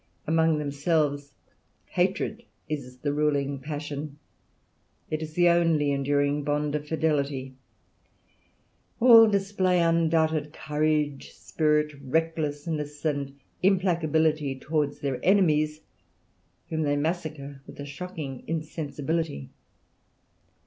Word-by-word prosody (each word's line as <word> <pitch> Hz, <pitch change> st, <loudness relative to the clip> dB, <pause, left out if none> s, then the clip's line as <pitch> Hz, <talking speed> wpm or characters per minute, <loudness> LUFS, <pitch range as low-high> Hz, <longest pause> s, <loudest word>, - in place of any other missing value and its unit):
Among 160 Hz, 0 st, +3 dB
themselves 145 Hz, 0 st, 0 dB, 0.5 s
hatred 190 Hz, +5 st, -1 dB, 0.3 s
is 135 Hz, -5 st, -5 dB
the 145 Hz, +2 st, -2 dB
ruling 145 Hz, -2 st, 0 dB
passion; 145 Hz, 0 st, -5 dB, 0.9 s
it 155 Hz, 0 st, -1 dB
is 155 Hz, -1 st, -6 dB
the 175 Hz, +1 st, +4 dB
only 165 Hz, -4 st, +3 dB
enduring 145 Hz, +1 st, +1 dB
bond 145 Hz, 0 st, -1 dB
of 150 Hz, 0 st, -3 dB
fidelity. 140 Hz, -4 st, -1 dB, 1.5 s
All 230 Hz, -2 st, +9 dB
display 195 Hz, -3 st, +1 dB
undoubted 160 Hz, -2 st, +2 dB
courage, 150 Hz, -2 st, -1 dB
spirit, 150 Hz, -1 st, 0 dB
recklessness, 150 Hz, 0 st, -2 dB, 0.6 s
implacability 160 Hz, -7 st, +2 dB
towards 150 Hz, -1 st, -1 dB
their 135 Hz, -3 st, -2 dB
enemies, 155 Hz, -6 st, +3 dB, 0.9 s
whom 160 Hz, -1 st, -1 dB
they 145 Hz, -1 st, +1 dB
massacre 150 Hz, -3 st, -3 dB
with -, -, -12 dB
a 145 Hz, -, -5 dB
shocking 145 Hz, -3 st, -7 dB
insensibility. 155 Hz, -, -3 dB
150 Hz, 95 wpm, -27 LUFS, 145-165 Hz, 1.5 s, All